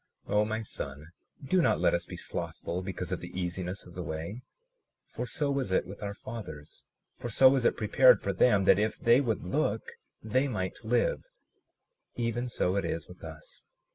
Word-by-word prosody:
37:46 - - -3
O 105 0 +4
my 110 +1 -2
son, 70 -7 -6 0.4
do 185 +6 +3
not 115 -8 +3
let - - +3
us 85 0 0
be - - -8
slothful 90 +2 -4
because 95 -1 -5
of - - -1
the 95 - -6
easiness 90 +1 -3
of 90 - -13
the 90 - -5
way; 85 +8 -5 0.6
for - - -5
so 145 -2 -1
was 135 -7 -1
it 95 - +2
with 100 +2 -10
our 100 -1 -4
fathers; 100 - -8 0.3
for 120 - -5
so 130 +4 +7
was 130 -2 +2
it - - +3
prepared 125 +4 +6
for 100 - -2
them, 100 +1 +4
that 95 - +6
if 110 +1 0
they 120 +3 +5
would 115 -7 -1
look 145 - 0 0.4
they 130 +6 +1
might 95 -7 -3
live; - - +1 0.9
even 120 +1 -1
so 90 -5 0
it 100 - +1
is 85 -1 -3
with 90 - -14
us. 80 -1 -10
105 Hz, 195 wpm, -30 LUFS, 90-125 Hz, 0.9 s, so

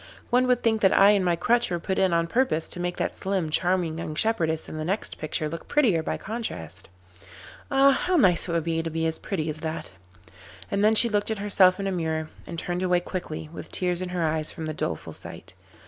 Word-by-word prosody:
'One 250 +1 +3
would 250 -1 +2
think 220 -2 +2
that 190 - +4
I 200 +1 +7
and 200 -2 +2
my 175 -1 +2
crutch 235 +8 +1
were 175 - -1
put 190 +3 -2
in 190 -1 +3
on 170 0 +2
purpose 230 -4 0
to - - -4
make 175 0 -2
that - - -2
slim, 190 -5 -2
charming 175 -1 +1
young 155 -2 -5
shepherdess 160 -7 0
in 155 - -7
the 155 - -3
next 190 +6 -3
picture 155 0 -2
look 165 +2 -7
prettier 230 - +3
by - - -3
contrast. 95 - -6 0.8
Ah! 275 0 +5
how 360 +6 0
nice 185 - +3
it - - -1
would 170 -1 0
be 165 0 -1
to 165 - -4
be 165 0 -2
as 160 0 -1
pretty 165 -6 -3
as 155 -1 -3
that.' 160 -5 -5 0.8
And 200 0 +1
then 215 +1 +5
she 235 - +7
looked 205 -2 0
at 220 - -1
herself 195 -2 +4
in 195 - -3
a 195 - 0
mirror, 160 -3 -2 0.2
and 170 - -6
turned 175 +2 -3
away 180 -1 +2
quickly 175 -4 -5
with - - -9
tears 180 -1 0
in 185 - -3
her 180 -1 -2
eyes 155 -1 0
from 160 - -6
the 155 - -3
doleful 80 - -4
sight. - - -10
175 Hz, 235 wpm, -25 LUFS, 160-205 Hz, 0.8 s, I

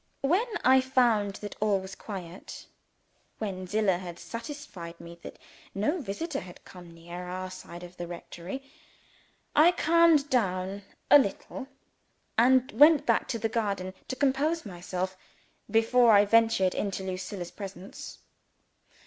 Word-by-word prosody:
When 360 - +2 0.2
I 260 +1 +6
found 235 -6 +2
that 205 - -6
all 205 -2 +2
was 190 0 -8
quiet 185 -4 -8 0.7
when 185 -4 -4
Zillah 200 -2 +1
had 175 -2 -8
satisfied 230 - -8
me 170 0 -11
that - - -10 0.4
no 295 - 0
visitor 275 - -4
had 180 -1 -12
come 180 -2 -12
near 170 +2 -9
our 185 +1 -5
side 175 -1 -10
of 180 0 -12
the 175 - -5
rectory 175 +7 -7 0.9
I 320 +4 +7
calmed 335 -3 +4
down 195 -4 0 0.3
a 290 - +10
little, 265 +3 -3 0.7
and 255 +3 +4
went 295 0 +6
back - - +2
to 235 - -2
the 225 - -1
garden 200 -5 -2
to 260 - -3
compose 290 +4 +1
myself 185 0 -4 0.5
before 230 +1 +4
I 205 0 +6
ventured 225 -4 +3
into 195 -1 -3
Lucilla's 185 -1 -5
presence. 195 -1 -9
205 Hz, 135 wpm, -28 LUFS, 185-260 Hz, 0.9 s, a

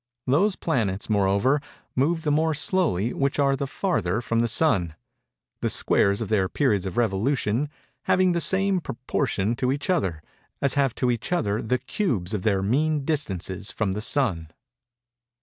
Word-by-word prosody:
Those 185 +10 +2
planets, 110 - -1
moreover, 100 +8 +2 0.3
move 160 +5 +1
the 150 - +1
more 155 +1 +2
slowly 140 - 0
which 140 0 -1
are 140 -1 +3
the 140 +1 -3
farther 110 - -1
from 115 -1 -1
the 120 - +2
Sun; 95 - +2 0.7
_the - - 0
squares 100 +2 +2
of 110 - -2
their 95 -4 +1
periods 105 -10 +1
of 95 - -6
revolution 120 +4 0 0.4
having 185 0 +3
the 170 -1 0
same 195 +1 +3
proportion 115 -5 -2
to 130 -1 0
each 145 +7 -1
other, 95 - -1 0.4
as 140 -2 +1
have 135 -4 +1
to 125 -1 +1
each 120 +7 -4
other 105 - 0
the 125 +3 0
cubes 125 - -2
of 105 - -1
their 100 -2 +1
mean 145 +7 +1
distances 95 - -2
from 105 -4 -1
the 100 - -3
Sun_. 110 - +1
125 Hz, 165 wpm, -25 LUFS, 100-150 Hz, 0.7 s, are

